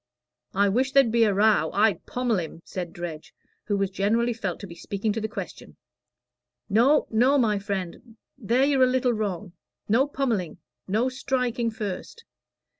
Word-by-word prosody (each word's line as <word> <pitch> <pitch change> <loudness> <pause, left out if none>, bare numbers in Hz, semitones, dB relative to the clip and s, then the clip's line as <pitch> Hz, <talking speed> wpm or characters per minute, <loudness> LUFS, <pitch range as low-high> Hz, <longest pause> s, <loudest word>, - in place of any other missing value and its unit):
"I 200 +1 +4
wish 255 +7 +1
there'd 270 -5 +5
be 230 0 +4
a 210 - +2
row 215 +1 +3
I'd 200 -6 +2
pommel 245 -5 0
him," 165 0 -7
said 175 -3 -5
Dredge, 170 -3 -8 0.3
who 205 -1 0
was 195 -1 -1
generally 225 +5 +1
felt 195 -6 -4
to - - -6
be 175 - -10
speaking 205 +4 -3
to 225 - -3
the 220 - -1
question. 220 - -8 0.9
"No, 245 +8 +4
no, 250 +6 +4
my 215 -6 +2
friend 200 +3 -5 0.2
there 250 +2 +1
you're 280 -2 +2
a 255 - +7
little 255 -1 +1
wrong. 205 -4 -3 0.3
No 245 +7 +3
pommelling 240 - -2 0.3
no 220 +6 +1
striking 250 -2 -1
first. 220 - -6
220 Hz, 165 wpm, -25 LUFS, 195-250 Hz, 0.9 s, a